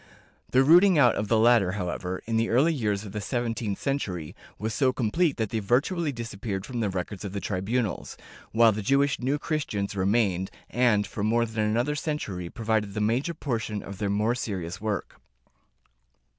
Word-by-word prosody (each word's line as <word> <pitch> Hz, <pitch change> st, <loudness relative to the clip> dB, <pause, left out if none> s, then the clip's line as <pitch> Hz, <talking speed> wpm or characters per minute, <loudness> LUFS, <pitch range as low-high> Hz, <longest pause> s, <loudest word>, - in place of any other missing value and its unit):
The 130 Hz, +1 st, +4 dB
rooting 175 Hz, +5 st, +6 dB
out 125 Hz, -5 st, +6 dB
of 105 Hz, -, -2 dB
the 115 Hz, -, +3 dB
latter, 110 Hz, -5 st, +4 dB
however, 90 Hz, -1 st, -4 dB
in 115 Hz, -, -2 dB
the 115 Hz, +1 st, +1 dB
early 140 Hz, +8 st, +3 dB
years 105 Hz, -7 st, -1 dB
of 100 Hz, -, -8 dB
the 105 Hz, +1 st, -4 dB
seventeenth 115 Hz, -2 st, -2 dB
century, 95 Hz, -, -3 dB, 0.2 s
was 110 Hz, +1 st, -3 dB
so 130 Hz, 0 st, +2 dB
complete 135 Hz, +7 st, +1 dB
that 110 Hz, -3 st, -2 dB
they 115 Hz, -, 0 dB
virtually 145 Hz, -, +1 dB
disappeared 110 Hz, -5 st, -5 dB
from 125 Hz, -2 st, -5 dB
the 110 Hz, -3 st, 0 dB
records 95 Hz, +1 st, -4 dB
of 100 Hz, -2 st, -5 dB
the 100 Hz, -, -2 dB
tribunals, 105 Hz, +3 st, -2 dB, 0.3 s
while 115 Hz, 0 st, +5 dB
the 105 Hz, 0 st, -3 dB
Jewish 140 Hz, +6 st, +2 dB
New 135 Hz, +4 st, 0 dB
Christians 125 Hz, -11 st, -2 dB
remained, 95 Hz, -1 st, +1 dB, 0.2 s
and, 115 Hz, -4 st, +3 dB
for 100 Hz, -, -5 dB
more 115 Hz, +2 st, +2 dB
than 110 Hz, -1 st, -2 dB
another 120 Hz, +7 st, +1 dB
century 125 Hz, -, -3 dB
provided 110 Hz, -2 st, -1 dB
the -, -, -1 dB
major 120 Hz, +10 st, 0 dB
portion 115 Hz, -8 st, -3 dB
of 100 Hz, 0 st, -9 dB
their 105 Hz, -2 st, -1 dB
more 105 Hz, +4 st, +1 dB
serious 100 Hz, -6 st, -4 dB
work. 105 Hz, -3 st, -4 dB
110 Hz, 180 wpm, -27 LUFS, 100-125 Hz, 0.3 s, rooting